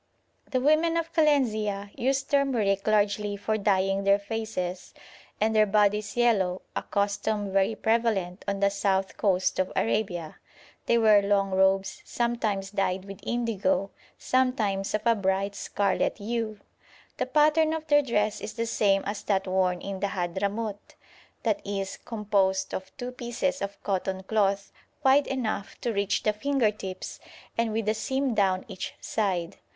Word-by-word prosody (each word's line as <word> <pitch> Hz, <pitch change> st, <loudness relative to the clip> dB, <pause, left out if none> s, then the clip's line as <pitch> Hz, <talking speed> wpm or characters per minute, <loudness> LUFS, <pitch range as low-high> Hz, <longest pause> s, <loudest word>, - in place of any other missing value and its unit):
The 255 Hz, -, +1 dB
women 310 Hz, +5 st, +3 dB
of 330 Hz, 0 st, -3 dB
Kalenzia 215 Hz, -10 st, +1 dB
use 270 Hz, +2 st, +1 dB
turmeric 245 Hz, -9 st, +1 dB
largely 205 Hz, -1 st, +1 dB
for 215 Hz, +2 st, -1 dB
dyeing 195 Hz, -1 st, +1 dB
their 200 Hz, 0 st, +5 dB
faces 200 Hz, -4 st, -4 dB, 0.4 s
and 220 Hz, +1 st, +1 dB
their 215 Hz, 0 st, +5 dB
bodies 210 Hz, +1 st, +2 dB
yellow, 195 Hz, -7 st, +2 dB
a -, -, 0 dB
custom 200 Hz, 0 st, -1 dB
very 195 Hz, +3 st, +2 dB
prevalent 220 Hz, -6 st, 0 dB
on 200 Hz, 0 st, -2 dB
the 200 Hz, 0 st, +4 dB
south 195 Hz, -1 st, 0 dB
coast 190 Hz, -3 st, +1 dB
of 185 Hz, -, 0 dB
Arabia; 180 Hz, -8 st, -1 dB, 0.5 s
they 235 Hz, -, +4 dB
wear 215 Hz, -3 st, +6 dB
long 200 Hz, -1 st, +1 dB
robes, 190 Hz, +1 st, +2 dB
sometimes 220 Hz, -5 st, -1 dB
dyed 190 Hz, -2 st, -1 dB
with 195 Hz, -1 st, -9 dB
indigo, 230 Hz, -1 st, 0 dB, 0.3 s
sometimes 220 Hz, -7 st, 0 dB
of 215 Hz, -, -2 dB
a 235 Hz, -, +5 dB
bright 195 Hz, -1 st, 0 dB
scarlet 200 Hz, -1 st, 0 dB
hue. 220 Hz, 0 st, -3 dB, 0.6 s
The -, -, -1 dB
pattern 305 Hz, +3 st, +4 dB
of 320 Hz, -1 st, -3 dB
their 290 Hz, -1 st, +5 dB
dress 210 Hz, -6 st, 0 dB
is 215 Hz, -, -5 dB
the 230 Hz, +1 st, -2 dB
same 200 Hz, -3 st, +2 dB
as 205 Hz, +1 st, -3 dB
that 195 Hz, -2 st, +1 dB
worn 185 Hz, -1 st, +1 dB
in 195 Hz, -1 st, -5 dB
the 200 Hz, -, 0 dB
Hadhramout, 200 Hz, +4 st, -3 dB, 0.5 s
i.e. 200 Hz, -2 st, -1 dB, 0.2 s
composed 200 Hz, -4 st, 0 dB
of 190 Hz, 0 st, -5 dB
two 250 Hz, -1 st, -5 dB
pieces 250 Hz, +3 st, -2 dB
of 200 Hz, 0 st, -5 dB
cotton 190 Hz, -1 st, -2 dB
cloth 200 Hz, -1 st, 0 dB, 0.3 s
wide 275 Hz, +1 st, +5 dB
enough 220 Hz, -6 st, -3 dB
to 235 Hz, -, -1 dB
reach 200 Hz, -1 st, 0 dB
the 215 Hz, -, +2 dB
finger 250 Hz, 0 st, +1 dB
tips 190 Hz, -3 st, -7 dB, 0.4 s
and 230 Hz, -1 st, 0 dB
with 220 Hz, 0 st, -2 dB
a 215 Hz, -, +3 dB
seam 265 Hz, +4 st, -1 dB
down 190 Hz, -3 st, +1 dB
each -, -, -6 dB
side. 190 Hz, -4 st, -2 dB
205 Hz, 150 wpm, -27 LUFS, 195-230 Hz, 0.6 s, wear